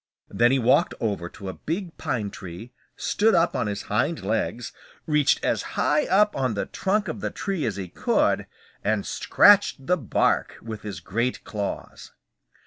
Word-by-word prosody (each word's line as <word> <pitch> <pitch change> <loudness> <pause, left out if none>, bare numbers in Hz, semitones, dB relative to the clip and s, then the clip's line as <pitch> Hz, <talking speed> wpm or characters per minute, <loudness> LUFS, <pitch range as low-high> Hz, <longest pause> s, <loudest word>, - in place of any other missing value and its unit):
Then 120 +1 +3
he 135 - +3
walked 125 0 +3
over 100 -6 -2
to 100 +1 -10
a 95 - -4
big 170 +2 -4
pine 105 -5 -2
tree, 95 +6 -9 0.2
stood 220 +2 +2
up 165 - +2
on 120 - 0
his 100 -1 -3
hind 140 - -1
legs, 115 +3 -2 0.3
reached 150 -2 +2
as - - +1 0.2
high 300 - +2
up 210 +2 +3
on 130 -5 0
the 100 - -1
trunk 210 +2 -1
of - - -5
the - - -1
tree 185 -9 -2
as 105 - -2
he 95 -2 -5
could, - - +1 0.4
and 105 -1 0
scratched 200 -9 +4
the 180 +4 +2
bark 120 - +1
with 110 -2 -7
his 105 -1 -7
great 115 +6 -2
claws. 105 -1 -6
120 Hz, 170 wpm, -25 LUFS, 105-165 Hz, 0.4 s, scratched